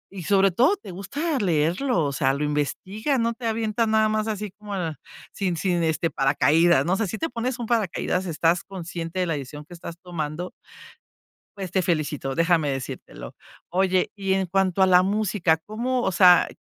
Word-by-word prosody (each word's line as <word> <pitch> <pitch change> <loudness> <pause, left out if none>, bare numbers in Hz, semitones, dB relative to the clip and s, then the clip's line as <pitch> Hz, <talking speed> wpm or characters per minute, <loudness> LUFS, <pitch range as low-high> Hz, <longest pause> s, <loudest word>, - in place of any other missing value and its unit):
y 185 - -6
sobre 195 +1 +4
todo, 260 - +3
te 370 - -10
gusta 280 - -3
leerlo, 175 - +1
o 140 - -1
sea, 135 0 +1
lo 145 - -2
investiga, 185 - -1
no 230 -1 +1
te 230 0 -5
avientas 225 0 0
nada 220 0 +3
más 215 0 0
así 210 -2 -3
como 205 0 -8
ah, 165 -5 -3 0.4
sin 185 -4 -2
sin, 175 +1 0
este, 160 0 0
paracaídas, 145 +2 +3
¿no? 180 +3 +2
No 220 +1 -1
si 220 - -4
te 325 - -2
pones 245 0 -3
un 240 - -4
paracaídas, 195 -4 -1
estás 165 +1 +1
consciente 170 -2 -6
de - - +1
la 165 - -1
decisión 145 +1 -7
que 175 - -13
estás 170 -1 -8
tomando. 170 0 -4 1.1
Pues 190 -3 -5
te 190 - +2
felicito, 150 -6 -1
déjame 165 -2 +2
decírtelo. 125 - -7 0.4
Oye, 185 0 +1
y 195 -2 -1
en 190 0 +1
cuanto 190 +1 +1
a - - +6
la 180 -1 +6
música, 195 -4 +1
¿cómo, 235 +9 -2
o 190 - 0
sea 180 -1 +6
185 Hz, 190 wpm, -24 LUFS, 165-215 Hz, 1.1 s, a